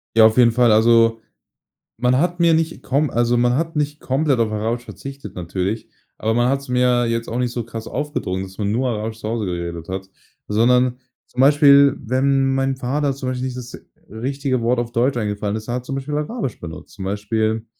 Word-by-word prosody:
Ja, 110 - +8
auf 110 +2 +4
jeden 120 -2 +6
Fall. 120 -1 +4
Also, 115 0 +4 0.8
man 125 +2 +2
hat 175 +4 0
mir 170 -1 +5
nicht 165 0 -1
komm 140 +3 0
also, 120 0 +2
man 120 0 +3
hat 165 +2 -2
nicht 150 0 -1
komplett 135 0 0
auf 110 -2 +1
Arabisch 115 +3 -2
verzichtet 140 +1 -9
natürlich, 95 +5 -3 0.3
aber 110 +1 0
man 120 +2 +2
hat's 140 0 -2
mir 125 -1 +2
jetzt 115 0 -2
auch 115 - -3
nicht 125 -1 0
so 120 -1 -3
krass 115 -1 -7
aufgedrungen, 125 -10 -3
dass 95 0 -11
man 105 -1 -1
nur 125 +3 0
Arabisch 110 0 -4
zu 110 - -5
Hause 115 -2 -2
geredet 85 -2 -4
hat. 95 +1 -5 0.4
Sondern 125 +3 +3 0.3
zum 125 - -2
Beispiel, 140 0 +6
wenn 135 +2 +1
mein 135 0 0
Vater 140 +3 -1
zum 130 -1 -4
Beispiel 130 0 -3
nicht 130 -1 -4
das 125 -1 -8 0.3
richtige 130 +3 -2
Wort 120 +1 +1
auf 120 -1 -3
Deutsch 120 +3 +1
eingefallen 105 -1 -2
ist, 110 0 -6
er 120 - -2
hat 125 0 -5
zum 135 - -5
Beispiel 135 +2 -4
Arabisch 150 - -3
benutzt. 85 0 -9
Zum 95 -2 -6
Beispiel, 110 +2 -1
120 Hz, 205 wpm, -20 LUFS, 110-135 Hz, 0.8 s, Ja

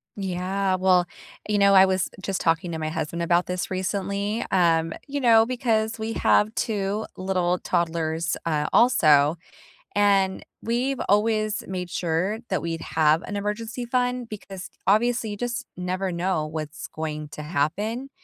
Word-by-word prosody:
Yeah. 190 0 -1
Well, 185 -1 +3 0.4
you 210 -1 +1
know, 200 0 +5
I 190 0 +8
was 190 -1 0
just 190 -1 -2
talking 165 +1 +1
to 160 - -4
my 155 0 -2
husband 165 +2 -3
about 175 +1 +2
this 180 +1 -3
recently, 200 +3 -2
um, 165 -3 +3 0.2
you 285 0 -3
know, 225 -2 +6
because 230 -2 0
we 220 +1 -3
have 215 +1 +3
2 205 -1 -1
little 180 -1 0
toddlers, 165 -1 -1
uh, 150 -2 0
also, 155 - +5 0.6
and 195 -2 +2 0.2
we've 250 +4 -1
always 215 +1 +1
made 180 -1 -4
sure 180 +6 -1
that - - 0
we'd 165 0 -3
have 155 +1 +2
an 205 - -4
emergency 220 +4 -3
fund 250 0 -1
because, 195 -3 -8 0.2
obviously, 230 +3 +2
you 205 - -5
just 245 +2 -3
never 185 +1 -2
know 175 -2 -1
what's 155 0 -6
going 155 -1 -5
to 150 - -8
happen. 200 - -2
190 Hz, 150 wpm, -24 LUFS, 170-220 Hz, 0.6 s, I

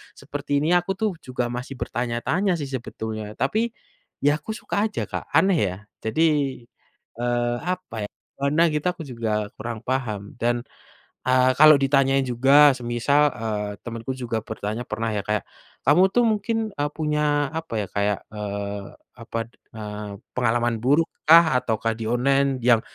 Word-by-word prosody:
seperti 145 0 -2
ini 160 - +1
aku 175 +2 -4
tuh 215 +2 0
juga 125 -2 -3
masih 125 +2 -5
bertanya-tanya 125 - -1
sih - - -2
sebetulnya 110 -4 -5
tapi, 175 +11 0 0.7
ya 145 +1 +4
aku 185 - -15
suka - - -5
aja 215 - -3
Kak - - -6
aneh 190 -5 +4
ya? 90 - -5 0.3
Jadi, 110 +9 +1 1.0
eee, 120 0 0 0.2
apa 185 -9 -9
ya - - -9 0.3
pernah 145 +4 +3
gitu 150 +3 -2
aku 175 - -8
juga 110 -5 -2
kurang 115 +1 -5
paham 125 -6 -1 0.2
dan, 120 0 +1 0.6
eee, 130 0 +4
kalau 155 0 +9
ditanya 135 0 +3
juga 135 +4 +6
semisal, 120 +4 +2
eee, 105 -2 -3
temanku 115 +2 -4
juga 120 -3 -2
bertanya 110 +1 -4
pernah 110 +1 -2
ya 105 -1 -1
kayak, 105 -1 0 0.4
kamu 150 +7 +5
tuh 240 -1 +4
mungkin, 220 +1 0
eee, 145 0 -1
punya 150 -2 +1
apa 160 -8 -7
ya - - -4
kayak, 100 0 0 0.2
eee, 100 -1 -4 0.4
apa, 115 - -4 0.4
eee, 105 -1 -6 0.3
pengalaman 120 -1 +1
buruk 145 +6 +3 0.2
kah 165 -2 +8
atau 115 -3 -1
kah 115 - +1
di 115 - -5
online 135 +2 +2
yang 120 -2 +5
125 Hz, 155 wpm, -24 LUFS, 115-145 Hz, 1.0 s, kalau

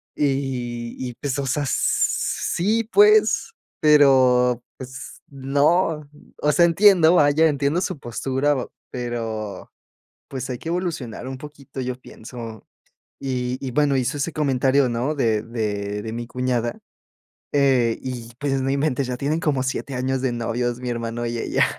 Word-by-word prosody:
Y 125 -4 -2
y 125 -1 -4
pues, 140 -1 -2
o 140 - -1
sea 145 +2 0
sí 215 +10 +1
pues, 420 +1 +5 0.3
pero 130 -5 +5 0.2
pues, 130 0 -9
no. 145 +3 +1 0.3
O 150 - +3
sea, 170 +4 +5
entiendo, 175 -1 +5
vaya, 150 0 +5
entiendo 145 +2 +1
su 185 -4 -2
postura, 135 +4 -1 0.4
pero, 115 -5 -5 0.6
pues, 135 0 -5
hay 125 - -3
que 160 - -8
evolucionar 165 -10 -3
un 130 - -5
poquito. 140 -2 -9
Yo 125 -1 -3
pienso. 115 -2 -9 0.6
Y 125 -2 -2
y 130 - -3
bueno, 140 +1 +2
hizo 130 +3 -1
ese 150 +3 -2
comentario, 135 -2 +2
¿no? 120 +6 -1
De 115 -6 +1
de 105 -3 -3
de 110 0 -5
mi 120 0 -5
cuñada, 125 -2 -1 0.8
eh, 130 -5 +3
y 120 -3 -6
pues, 135 -1 0
no 135 - 0
inventes 140 -1 0
ya 125 - -2
tienen 145 +5 -1
como 140 -5 0
7 130 +1 -3
años 130 +1 -1
de 130 - +1
novios, 120 +1 -2
mi 125 -1 -3
hermano 120 0 -3
y 120 0 -3
ella. - - +2
130 Hz, 150 wpm, -22 LUFS, 120-145 Hz, 0.8 s, pues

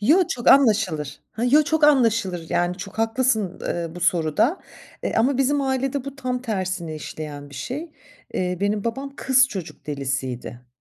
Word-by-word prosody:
Yo, 310 - +5
çok 240 - -1
anlaşılır. 200 - +3
Ha, 230 - -2
yo, 285 +5 +5
çok 310 +1 +2
anlaşılır. 230 - +3
Yani, 175 +1 +1
çok 200 +3 -8
haklısın, 225 -4 +1
eee, 170 -1 -2
bu 175 - -8
soruda. 170 - +2 0.4
E, - - -2
ama 250 +4 +2
bizim 280 +2 +2
ailede 265 0 -1
bu 275 0 -7
tam 250 -2 -3
tersine 185 -7 -3
işleyen 150 -1 -7
bir - - -12
şey. 290 - -5 0.4
Eee, 180 -1 -1
benim 205 +1 0
babam 275 +4 -4
kız 265 0 +4
çocuk 175 -6 -7
delisiydi. 130 -3 -4
220 Hz, 160 wpm, -23 LUFS, 170-265 Hz, 0.4 s, Yo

